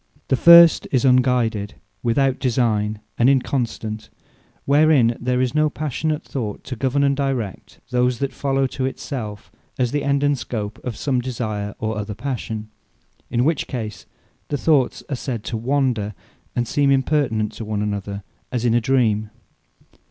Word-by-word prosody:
The - - +4
first 170 +3 +8
is 130 0 +2
Unguided, 125 -5 +2 0.3
Without 130 +3 +1
Designee, 110 -4 +1 0.2
and 120 +2 +5
inconstant; 115 -5 -1 0.6
Wherein 140 -5 +4
there 125 +1 0
is 130 0 0
no 155 0 +3
Passionate 150 +1 -2
Thought, 110 -7 -5
to 130 - -6
govern 135 +4 0
and 140 0 +3
direct 135 -8 -3
those 125 0 +2
that 140 +2 -2
follow, 135 -1 0
to 130 0 -2
it 135 - -6
self, 105 -8 -6 0.3
as 125 -2 0
the 145 -1 -1
end 140 0 +1
and 145 0 +3
scope 110 -4 -5
of 125 -3 -4
some 130 -4 0
desire, 110 -5 -4
or 110 -1 -3
other 105 0 -5
passion: 110 -3 -5 0.6
In 120 +2 +1
which 160 -2 0
case 110 -4 -6 0.4
the 145 - -2
thoughts 140 -4 +2
are 140 - -2
said 120 -4 -4
to 115 - -4
wander, 120 -4 0 0.4
and 120 -1 0
seem 145 +2 +2
impertinent 130 -6 +1
one 110 -1 -3
to - - 0
another, 100 -1 -4 0.3
as 125 -1 -1
in 115 - +3
a 120 - +3
Dream. 110 -4 +1
125 Hz, 160 wpm, -21 LUFS, 110-140 Hz, 0.6 s, first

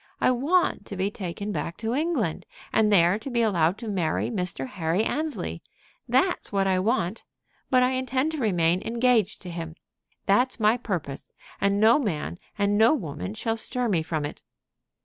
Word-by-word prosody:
I - - +4
want 280 - +1
to 200 - -5
be 195 +2 0
taken 200 +1 -5
back 170 -4 -4
to 225 +1 -2
England, 275 - -1 0.3
and 215 -1 +3
there 180 +1 +4
to 235 - -6
be 235 -2 +1
allowed 180 -4 +2
to 230 - -7
marry 185 -2 -1
Mr. 180 - -1
Henry 165 +6 -1
Annesley. 310 +5 -3 0.5
That's 370 -1 +1
what 195 -1 +1
I 190 -1 +2
want. 200 -1 0 0.5
But 255 -1 +4
I 250 - +2
intend 260 +3 0
to 315 - -4
remain 180 -6 +2
engaged 230 -3 +1
to 180 - -7
him. 165 -1 -6 0.5
That's 245 +6 +2
my 215 +1 +4
purpose, 170 - -4 0.3
and 200 0 +2
no 225 +6 +6
man 175 - -3 0.2
and 205 0 +2
no 230 +7 +6
woman 170 - -5
shall 225 0 -2
stir 245 +2 0
me 175 -6 +2
from 155 -2 -2
it." 145 - -7
210 Hz, 175 wpm, -26 LUFS, 175-245 Hz, 0.5 s, no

